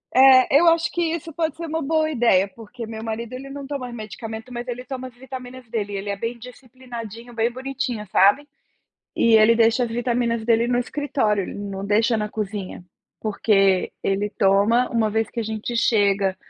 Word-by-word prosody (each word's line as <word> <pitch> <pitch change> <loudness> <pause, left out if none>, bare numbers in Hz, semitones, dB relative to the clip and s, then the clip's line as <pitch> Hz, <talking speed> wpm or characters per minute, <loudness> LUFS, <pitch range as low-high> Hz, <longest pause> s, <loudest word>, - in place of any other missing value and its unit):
Eh, 260 +1 +7
eu 345 - +4
acho 330 0 +2
que 345 - -2
isso 330 -1 -2
pode 320 -1 -1
ser 335 0 -6
um 320 +1 -2
boa 315 +2 +1
ideia, 230 -8 +3
porque 230 +3 -10
meu 220 0 -7
marido 225 +1 -5
ele 270 +2 -7
não 280 0 -7
toma 270 -3 -5
medicamento, 220 +1 -8
mas 240 +1 -5
ele 245 0 -5
toma 260 -2 -6
as 245 - -15
vitaminas 255 -1 -9
dele, 205 -3 -3
ele 200 +1 -4
é 200 - -1
bem 230 +4 -4
disciplinadinho, 240 -2 -10
bem 230 0 +1
bonitinho 260 -4 -4
sabe, 205 +10 +4 0.7
e 230 -1 +4
ele 220 +1 +6
deixa 230 +2 +3
as 240 - -2
vitaminas 235 -1 -1
dele 230 +1 +2
no 245 0 +1
escritório, 245 -7 0
ele - - -7
não 200 -1 -5
deixa 220 +3 +2
na 210 0 -1
cozinha, 205 -4 -5 0.4
porque 195 -3 +2
ele 200 +2 0
toma, 205 +5 +3
um 225 -2 +2
vez 220 0 0
que 235 - -5
a 230 - -1
gente 220 +2 -4
chega 200 -4 +2
235 Hz, 190 wpm, -22 LUFS, 215-255 Hz, 0.7 s, Eh